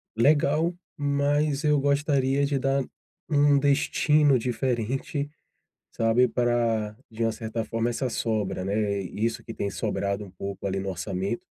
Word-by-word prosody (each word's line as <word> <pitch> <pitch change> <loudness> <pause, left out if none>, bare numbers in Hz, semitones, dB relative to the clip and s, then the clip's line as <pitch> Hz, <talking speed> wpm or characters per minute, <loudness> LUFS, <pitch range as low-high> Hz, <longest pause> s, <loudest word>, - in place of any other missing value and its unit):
legal, 150 +6 +3 0.2
mas 145 +1 +1
eu 150 -1 +4
gostaria 140 -1 +2
de 140 0 0
dar 135 +1 +1 0.5
um 145 -2 +4
destino 145 0 +3
diferente, 125 +4 -2 0.7
sabe. 115 +2 +3
Pra, 115 -3 0 0.2
de 110 +1 -5
uma 115 - +1
certa 110 +1 -4
forma 115 +1 -1
essa 125 +2 -2
sobra, 105 -6 -1
né, 100 0 0
isso 110 +4 -2
que 115 - -7
tem 100 - -2
sobrado 100 -1 -2
um 100 - -12
pouco, 100 +1 -6
ali, 95 0 -1
no 95 0 -3
orçamento. 95 +4 -3
120 Hz, 140 wpm, -26 LUFS, 105-140 Hz, 0.7 s, eu